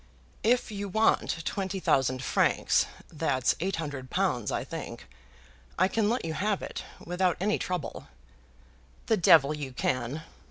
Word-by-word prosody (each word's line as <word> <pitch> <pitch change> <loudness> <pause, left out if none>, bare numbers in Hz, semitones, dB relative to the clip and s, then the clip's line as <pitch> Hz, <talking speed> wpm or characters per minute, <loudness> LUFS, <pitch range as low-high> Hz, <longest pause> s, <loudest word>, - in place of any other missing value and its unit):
"If 240 0 +2
you 200 -1 -4
want 190 -5 +2
twenty 195 -1 -2
thousand 130 -6 +2
francs, - - +2 0.3
that's 140 -5 +1
eight 190 +4 -1
hundred 145 -5 -5
pounds, 175 - 0
I - - -1
think - - -7 0.7
I 185 - +4
can 210 +1 +1
let 240 -3 0
you 160 - -2
have 205 +4 0
it - - -5 0.2
without 180 0 +1
any 210 +3 +1
trouble." 180 -4 -4 1.0
"The 220 - +2
devil 155 -4 +6
you 145 -4 -5
can!" 130 +4 -1
175 Hz, 145 wpm, -28 LUFS, 140-195 Hz, 1.0 s, devil